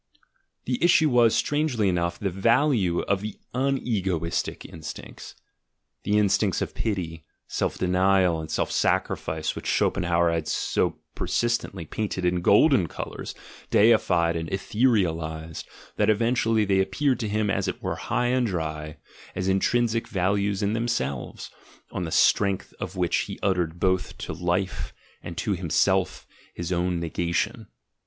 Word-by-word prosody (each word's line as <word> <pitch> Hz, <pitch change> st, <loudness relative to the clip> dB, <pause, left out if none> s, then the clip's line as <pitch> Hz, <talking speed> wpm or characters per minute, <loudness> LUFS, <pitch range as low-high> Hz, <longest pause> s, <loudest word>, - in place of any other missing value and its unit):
The 125 Hz, +4 st, -1 dB
issue 160 Hz, -3 st, +5 dB
was, 120 Hz, -2 st, +5 dB
strangely 145 Hz, -8 st, +1 dB
enough, 85 Hz, -2 st, 0 dB
the 100 Hz, -2 st, -2 dB
value 105 Hz, -, +2 dB
of 100 Hz, -1 st, 0 dB
the 105 Hz, 0 st, -6 dB, 0.2 s
"unegoistic" 105 Hz, -, -1 dB
instincts, 80 Hz, -2 st, -9 dB, 0.7 s
the 105 Hz, +1 st, +1 dB
in 105 Hz, -, +4 dB
stincts -, -, +1 dB
of -, -, -3 dB
pity, 85 Hz, -7 st, -3 dB, 0.2 s
self -, -, -2 dB
denial, 90 Hz, -2 st, +2 dB
and 80 Hz, -, -8 dB
self 80 Hz, -, -1 dB
sacrifice 80 Hz, -1 st, 0 dB
which -, -, -6 dB
Schop -, -, +2 dB
enhauer 85 Hz, -2 st, +2 dB
had 80 Hz, -1 st, -2 dB
so -, -, 0 dB, 0.2 s
persistently 115 Hz, -7 st, -1 dB
painted 95 Hz, +1 st, -3 dB
in 90 Hz, 0 st, +1 dB
golden 105 Hz, -, +5 dB
colours, -, -, -6 dB, 0.3 s
deified 90 Hz, -6 st, +4 dB
and 80 Hz, 0 st, -3 dB
etherealised, 85 Hz, -8 st, 0 dB, 0.3 s
that 105 Hz, 0 st, +2 dB
eventually 115 Hz, 0 st, +2 dB
they 95 Hz, -1 st, +2 dB
appeared 130 Hz, +6 st, +1 dB
to 110 Hz, -4 st, -2 dB
him, 105 Hz, -1 st, 0 dB
as 95 Hz, -1 st, -1 dB
it -, -, -3 dB
were, -, -, -2 dB
high 125 Hz, -, -1 dB
and 125 Hz, -1 st, +2 dB
dry, 80 Hz, -4 st, -4 dB, 0.4 s
as 95 Hz, -, -2 dB
"intrinsic 115 Hz, +4 st, +1 dB
values 100 Hz, +1 st, 0 dB
in 100 Hz, +1 st, +1 dB
them 115 Hz, +1 st, -1 dB
selves," 70 Hz, -, -3 dB, 0.4 s
on 90 Hz, -, -3 dB
the 80 Hz, -, -5 dB
strength 100 Hz, +2 st, +2 dB
of -, -, -5 dB
which 90 Hz, -2 st, +1 dB
he -, -, -6 dB
uttered 90 Hz, -3 st, 0 dB
both 95 Hz, -1 st, 0 dB
to -, -, -5 dB
Life 90 Hz, +2 st, -2 dB, 0.3 s
and 85 Hz, -1 st, -8 dB
to 105 Hz, -, -1 dB
himself 85 Hz, -3 st, +1 dB, 0.3 s
his 85 Hz, +1 st, -4 dB
own 90 Hz, 0 st, 0 dB
negation. 85 Hz, +1 st, -2 dB
95 Hz, 145 wpm, -25 LUFS, 85-110 Hz, 0.7 s, issue